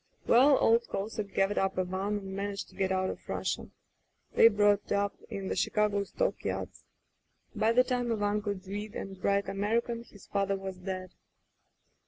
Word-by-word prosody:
"Well, 265 +4 +6
old 230 +1 +3
Kosek 200 0 -4
gathered 195 +1 +2
up 195 -1 0
Ivan 190 +3 -1
and 195 -1 -6
managed 200 0 -4
to - - -19
get 190 -1 0
out 185 0 +1
of - - -11
Russia. - - -2 0.6
They - - +8
brought 205 -2 +3
up 200 0 +1 0.2
in 195 -1 -4
the - - -1
Chicago 210 -1 +1
stock - - -1
yards. - - -4 0.7
By 220 +1 +3
the 250 +2 +6
time 245 -2 -1
Ivan 205 -1 0
could 200 -2 -4
read 205 +2 -5
and 190 -1 -7
write 200 0 +2
American, 230 +4 -1
his 205 -4 -16
father 195 -1 0
was 190 -1 -6
dead. 185 -1 -5
200 Hz, 170 wpm, -30 LUFS, 195-215 Hz, 0.7 s, They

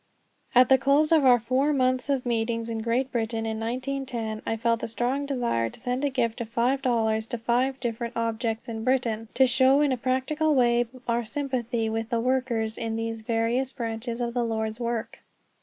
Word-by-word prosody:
At 250 +1 +7
the 265 -1 +6
close 280 +4 +3
of 315 -4 +5
our 250 -1 +7
four 260 +6 +1
months 255 0 +1
of 270 -3 0
meetings 230 -1 -1
in 225 - -3
Great 245 +3 0
Britain, 225 -1 -2
in 220 0 -3
1910, 245 -2 -3
I 225 - -1
felt 230 0 +1
a - - -2
strong 250 +5 -1
desire 235 - 0
to - - -14
send 250 +2 -2
a 285 - +2
gift 240 -3 -1
of 225 - -5
five 245 +4 +1
dollars 220 -4 +1
to 240 - -3
five 250 +4 0
different 235 -1 -3
objects 230 0 -2
in 225 -1 -5
Britain, 235 -3 0
to 265 - +6
show 260 +2 +4
in 290 -2 +3
a 255 - 0
practical 270 +5 0
way 240 -2 +3 0.2
our 235 0 +1
sympathy 240 -2 -2
with 225 0 -2
the 235 - 0
workers 240 -3 -1
in 225 -1 -2
these 225 0 -3
various 230 +3 0
branches 230 0 -4
of 235 -1 -2
the 245 -1 0
Lord's 220 -1 -2
work. 235 -1 -3
240 Hz, 195 wpm, -26 LUFS, 225-260 Hz, 0.2 s, At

